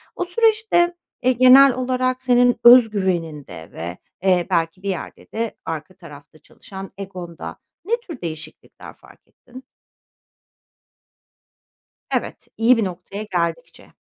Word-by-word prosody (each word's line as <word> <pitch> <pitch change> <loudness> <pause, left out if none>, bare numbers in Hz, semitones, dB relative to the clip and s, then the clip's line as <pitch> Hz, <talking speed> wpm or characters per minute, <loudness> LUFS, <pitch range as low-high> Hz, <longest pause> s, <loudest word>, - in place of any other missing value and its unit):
O 360 - -2
süreçte, 430 -3 +2 0.3
eee, 255 - +4
genel 255 +2 +7
olarak 255 0 -1
senin 245 -2 +3
öz 240 -1 +8
güveninde 165 - -4
ve, 85 +2 -7 0.3
eee, 180 -3 +2
belki 170 +1 -1
bir 200 - -3
yerde 185 - -7
de 225 0 -3
arka 160 +2 -6
tarafta 155 -4 -15
çalışan 190 +5 -11
egonda 180 -4 -8 0.3
ne 445 - -2
tür 335 - -10
değişiklikler 160 -2 -9
fark - - -21
ettin? 255 +2 -15 2.5
Evet, - - -3
iyi 230 +2 +4
bir 225 - +1
noktaya 185 +3 -7
geldikçe. 170 -4 -4
200 Hz, 120 wpm, -21 LUFS, 170-255 Hz, 2.5 s, öz